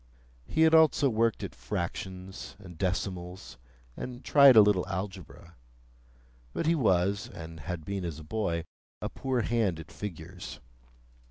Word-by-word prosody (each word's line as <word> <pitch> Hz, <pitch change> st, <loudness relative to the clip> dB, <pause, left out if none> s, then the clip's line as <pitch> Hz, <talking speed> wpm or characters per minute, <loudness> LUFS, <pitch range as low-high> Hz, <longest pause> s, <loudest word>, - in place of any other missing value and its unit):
He 160 Hz, -, 0 dB
had 160 Hz, 0 st, +6 dB
also 155 Hz, -4 st, +5 dB
worked 115 Hz, 0 st, +1 dB
at -, -, -5 dB
fractions 95 Hz, +2 st, -5 dB
and 95 Hz, -4 st, -12 dB
decimals, 90 Hz, -1 st, -3 dB, 0.4 s
and 125 Hz, 0 st, -7 dB
tried 140 Hz, -3 st, +8 dB
a 110 Hz, -, +11 dB
little 100 Hz, -3 st, +4 dB
algebra; 95 Hz, -3 st, -6 dB, 1.0 s
but -, -, -2 dB
he 165 Hz, -, +4 dB
was, 100 Hz, -, +2 dB
and 80 Hz, 0 st, -9 dB
had 80 Hz, +1 st, -5 dB
been 100 Hz, -1 st, -3 dB
as 85 Hz, -4 st, -4 dB
a 80 Hz, -, -9 dB
boy, 85 Hz, -2 st, -2 dB, 0.3 s
a -, -, -3 dB
poor 130 Hz, -2 st, -1 dB
hand 110 Hz, -7 st, 0 dB
at 80 Hz, -, -10 dB
figures. 90 Hz, -2 st, -7 dB
95 Hz, 145 wpm, -29 LUFS, 85-115 Hz, 1.0 s, a